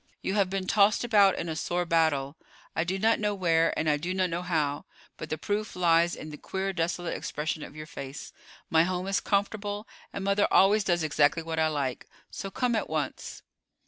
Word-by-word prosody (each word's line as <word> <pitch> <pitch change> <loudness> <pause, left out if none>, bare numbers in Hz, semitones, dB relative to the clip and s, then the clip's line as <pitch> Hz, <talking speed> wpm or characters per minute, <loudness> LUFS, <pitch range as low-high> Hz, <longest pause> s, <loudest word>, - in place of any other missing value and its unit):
You 190 - -1
have 200 -2 +2
been 195 0 -2
tossed 205 +3 +3
about 205 -5 +5
in 170 - -3
a 160 - -3
sore 175 +2 -1
battle. 160 -4 +1 0.4
I 160 - +1
do 185 +3 -2
not 225 +3 +2
know 210 -1 0
where, 165 -3 +2
and 160 - 0
I 150 -1 +3
do 175 +5 -3
not 185 -2 +1
know 170 +1 -2
how; 155 -5 -1 0.3
but 155 - -8
the 155 - -2
proof 210 +6 -3
lies 170 -1 +3
in 155 - -8
the 150 - -8
queer, 195 0 -3
desolate 175 0 -2
expression 155 +1 -3
of 145 - -9
your 155 0 -7
face. 140 -2 -8 0.3
My 160 - +4
home 180 +1 -2
is 195 +1 +1
comfortable, 205 +1 -1 0.2
and 200 - -5
mother 200 +1 +2
always 205 +2 +5
does 175 -4 +1
exactly 155 +1 +2
what 160 0 -3
I 160 - +3
like; 140 -5 -3 0.2
so 195 - -5
come 245 +3 0
at 215 - -2
once." 150 -3 -4
175 Hz, 210 wpm, -28 LUFS, 155-195 Hz, 0.4 s, about